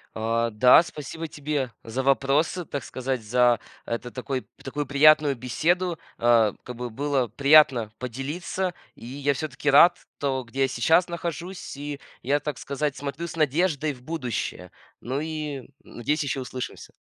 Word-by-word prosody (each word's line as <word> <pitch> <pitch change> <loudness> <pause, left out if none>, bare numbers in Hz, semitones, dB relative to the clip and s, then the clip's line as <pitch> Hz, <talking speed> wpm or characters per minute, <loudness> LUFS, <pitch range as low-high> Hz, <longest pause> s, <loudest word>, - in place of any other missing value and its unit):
А, 115 +1 0
да, 125 +8 +7
спасибо 160 0 -7
тебе 145 -4 -2
за 115 +4 -3
вопросы, 140 +6 +2
так 140 -2 -5
сказать, 130 -1 -3
за, 120 +2 +3 0.2
это, 120 +1 -4
такой, 130 +1 -4
п - - -32 0.2
такую 145 +2 -3
приятную 145 0 +5
беседу. 165 +8 0 0.2
А, 115 -3 +4
как 125 -1 -7
бы 125 0 -5
было 135 0 0
приятно 140 -3 +5
поделиться, 150 +9 -3 0.2
и - - -14
я 140 +2 -1
всё-таки 150 0 -2
рад 170 +5 +7 0.2
то, 135 -2 -1
где 130 +4 -3
я 135 - +3
сейчас 160 +8 +3
нахожусь, 170 -1 -5
и 145 0 -6 0.2
я, 145 +3 +1
так 150 -4 -4
сказать, 140 0 -2
смотрю 145 +4 -5
с 165 - -8
надеждой 155 0 +1
в 125 - -15
будущее. 125 - -4 0.3
Ну 130 +4 -3
и, 155 -3 -4
м, 130 - -16 0.2
надеюсь, 145 +6 -2
ещё 140 -1 -2
услышимся. 125 0 -7
140 Hz, 160 wpm, -25 LUFS, 125-155 Hz, 0.3 s, да